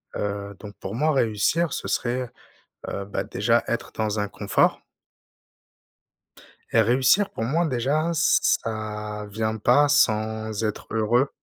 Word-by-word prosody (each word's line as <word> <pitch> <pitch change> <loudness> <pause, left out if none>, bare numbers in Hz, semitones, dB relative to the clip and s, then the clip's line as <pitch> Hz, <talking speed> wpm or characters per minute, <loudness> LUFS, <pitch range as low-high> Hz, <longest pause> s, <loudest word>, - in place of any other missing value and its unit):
Heu, 100 0 -4
donc 105 -1 -10
pour 95 - -6
moi 155 +6 +2
réussir 135 +7 +1
ce - - -4
serait, 125 0 -1 0.6
heu, 100 - -4
bah, 100 - -3
déjà 115 +4 +1
être 115 - -3
dans 110 -1 -1
un 105 - -1
confort 100 0 +1 1.9
et 115 - +5
réussir 130 - +3
pour - - -5
moi 155 +9 +1
déjà, 140 +5 0
ça 105 -8 0
vient 110 +1 -2
pas 125 +7 +4
sans 110 -5 +1
être 105 -1 -3
heureux. 120 +5 +2
110 Hz, 130 wpm, -24 LUFS, 105-130 Hz, 1.9 s, et